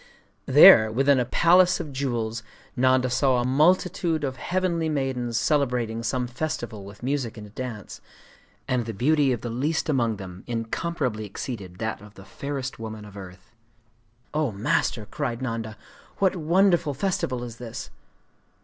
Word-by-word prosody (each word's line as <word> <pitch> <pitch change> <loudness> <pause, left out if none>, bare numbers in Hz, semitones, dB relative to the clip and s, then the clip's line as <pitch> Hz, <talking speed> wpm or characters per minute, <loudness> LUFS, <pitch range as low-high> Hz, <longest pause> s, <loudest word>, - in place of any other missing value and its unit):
There, 110 0 +8
within 135 +3 +3
a 125 - +1
palace 175 +7 +4
of 145 - -6
jewels, 120 -4 -2 0.3
Nanda 130 0 +3
saw 130 +1 +2
a 120 - 0
multitude 165 +3 +2
of 130 -2 -3
heavenly 175 -2 -1
maidens 130 -5 -1
celebrating 120 -5 0
some 125 +2 -1
festival 120 -5 -4
with 100 +3 -12
music 130 -4 -2
and 105 -1 -10
dance; 115 -4 -7 0.7
and 125 -3 0
the 115 - -5
beauty 145 +4 +3
of 120 - -2
the 120 - -4
least 150 +8 -1
among 120 -6 +1
them 95 -2 -9
incomparably 115 -1 -3
exceeded 100 -3 -7
that 110 0 -3
of 105 0 -15
the 95 - -13
fairest 135 0 -5
woman 110 -1 -7
of 105 -1 -13
earth. 95 -1 -11 0.8
'O 150 -4 0
Master,' 110 0 0
cried 120 0 -3
Nanda, 115 -4 -4 0.4
'what 190 -1 +2
wonderful 175 -2 +2
festival 135 -7 -1
is 115 -2 -8
this? 120 -1 -7
125 Hz, 150 wpm, -25 LUFS, 110-145 Hz, 0.8 s, There